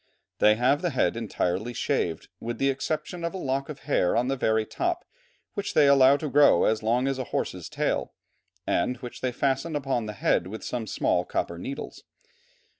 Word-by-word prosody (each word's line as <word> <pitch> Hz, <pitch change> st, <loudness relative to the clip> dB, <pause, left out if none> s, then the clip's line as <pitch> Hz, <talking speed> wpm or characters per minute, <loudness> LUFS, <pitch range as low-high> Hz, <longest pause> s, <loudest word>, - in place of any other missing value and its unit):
They 105 Hz, 0 st, +6 dB
have 130 Hz, +6 st, +2 dB
the 180 Hz, -, 0 dB
head 130 Hz, -6 st, +1 dB
entirely 110 Hz, -1 st, -2 dB
shaved, -, -, -1 dB
with 120 Hz, +1 st, -4 dB
the 135 Hz, 0 st, +2 dB
exception 155 Hz, +5 st, -3 dB
of 170 Hz, +3 st, -2 dB
a -, -, -2 dB
lock 135 Hz, -4 st, -2 dB
of 150 Hz, -2 st, -8 dB
hair 140 Hz, -11 st, +1 dB
on 125 Hz, +2 st, +1 dB
the 135 Hz, -, +1 dB
very 110 Hz, -4 st, +1 dB
top, 350 Hz, -, -2 dB, 0.5 s
which 200 Hz, 0 st, -4 dB
they 150 Hz, -, +6 dB
allow 140 Hz, 0 st, +6 dB
to 155 Hz, -, -4 dB
grow 145 Hz, -10 st, +5 dB
as 110 Hz, 0 st, +2 dB
long 120 Hz, +4 st, +1 dB
as 135 Hz, -1 st, -1 dB
a 130 Hz, -, -2 dB
horse's -, -, -3 dB
tail, -, -, -1 dB, 0.5 s
and 125 Hz, +8 st, 0 dB
which 125 Hz, 0 st, -9 dB
they 130 Hz, -, 0 dB
fasten 135 Hz, +5 st, -1 dB
upon 135 Hz, -6 st, -1 dB
the 105 Hz, -, -5 dB
head 90 Hz, -3 st, +1 dB
with 110 Hz, +4 st, -7 dB
some 120 Hz, -3 st, -4 dB
small -, -, +1 dB
copper 85 Hz, 0 st, -3 dB
needles. 135 Hz, +9 st, -7 dB
130 Hz, 190 wpm, -26 LUFS, 115-145 Hz, 0.5 s, They